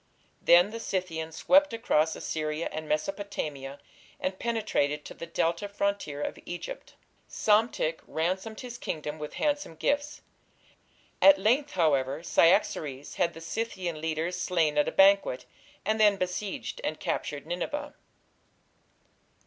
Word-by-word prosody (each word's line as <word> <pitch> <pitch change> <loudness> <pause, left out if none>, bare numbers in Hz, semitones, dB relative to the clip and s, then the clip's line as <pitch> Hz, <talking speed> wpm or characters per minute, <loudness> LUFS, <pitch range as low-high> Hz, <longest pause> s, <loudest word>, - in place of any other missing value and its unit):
Then 175 +4 +6
the 230 - -5
Scythians 165 -6 -3
swept 290 -2 +4
across 160 -9 +1
Assyria 155 +1 -3
and 155 0 -6
Mesopotamia, 150 -5 -3 0.4
and 185 0 -3
penetrated 210 -11 0
to - - -8
the 170 - -8
Delta 170 +3 0
frontier 200 -8 -2
of - - -4
Egypt. 175 - -7 0.3
Psamtik 230 - +2
ransomed 190 +7 -2
his 245 -1 -8
kingdom 155 0 -4
with 150 0 -6
handsome 290 - -1
gifts. 290 - -1 1.0
At 290 0 +8
length, 270 +7 +2
however, 145 -3 +1
Cyaxares 155 -7 +2
had 170 -2 +1
the 165 - -9
Scythian 180 -5 -3
leaders 160 +3 -2
slain 160 -5 +2
at 150 - +3
a - - 0
banquet, 195 -9 +4 0.4
and 215 +2 +1
then 205 -2 +5
besieged 190 - -3
and - - -2
captured - - -3
Nineveh. - - -4
180 Hz, 125 wpm, -28 LUFS, 155-220 Hz, 1.0 s, At